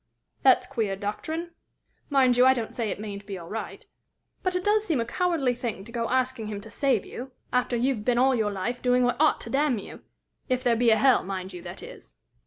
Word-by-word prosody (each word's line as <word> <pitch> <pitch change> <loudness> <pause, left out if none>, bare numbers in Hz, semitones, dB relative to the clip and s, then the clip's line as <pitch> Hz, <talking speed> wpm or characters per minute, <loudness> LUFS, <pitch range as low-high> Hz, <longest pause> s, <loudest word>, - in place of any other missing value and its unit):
"That's 260 -1 +5
queer 225 -7 -2
doctrine! 315 - -4 0.6
Mind 265 -3 +4
you, 250 - +5
I 260 +1 +6
don't 230 -3 -4
say 230 -3 -2
it - - -4
mayn't 205 -1 -7
be 195 -2 -5
all 170 -2 -10
right. 225 - -6 0.6
But 370 -1 -1
it 360 - -1
does 420 +1 +3
seem 325 - 0
a 230 - 0
cowardly 315 -1 +1
thing 235 -5 -5
to 235 - -12
go 230 -1 -2
asking 255 -3 0
him 210 -1 -4
to 220 +1 -12
save 265 -6 +1
you, 255 +2 -8 0.2
after 250 0 +1
you've 240 -2 0
been 245 +1 +1
all 260 +2 +4
your 220 -4 0
life 205 +6 -3
doing 250 0 +3
what 245 +4 +1
ought 310 - +4
to 230 - -6
damn 275 -2 +2
you 200 - -9 0.5
if 255 0 0
there 240 -3 +3
be 235 +1 +3
a 220 - +5
hell, 255 +3 +4
mind 190 0 -5
you, 175 - -8
that 175 0 -9
is." - - -12
245 Hz, 230 wpm, -26 LUFS, 215-265 Hz, 0.6 s, I